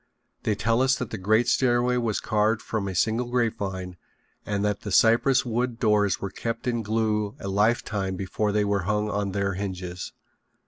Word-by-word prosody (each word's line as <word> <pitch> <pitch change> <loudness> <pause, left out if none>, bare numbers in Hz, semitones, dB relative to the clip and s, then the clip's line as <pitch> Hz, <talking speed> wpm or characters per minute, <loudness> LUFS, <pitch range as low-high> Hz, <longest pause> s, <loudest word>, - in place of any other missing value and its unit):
They 105 - 0
tell 115 +4 +1
us 130 0 +3
that 125 -4 -5
the 110 - -3
great 110 +5 +2
stairway 125 0 +2
was 115 -4 0
carved 110 0 +1
from 105 -3 -3
a 95 - -4
single 115 +6 +1
grapevine 95 -7 -2 0.5
and 100 0 -1
that 105 -1 -1
the 100 - -6
cypress 120 +6 +4
wood 120 0 -1
doors 105 -3 +2
were 100 - -4
kept 115 +4 -4
in 120 -2 0
glue 105 -1 -1
a - - -6
lifetime 100 -1 0
before 100 +3 -1
they 105 0 +1
were 100 -3 0
hung 105 0 0
on 100 -1 -1
their 100 0 -1
hinges. 90 -2 -5
105 Hz, 180 wpm, -25 LUFS, 100-115 Hz, 0.5 s, cypress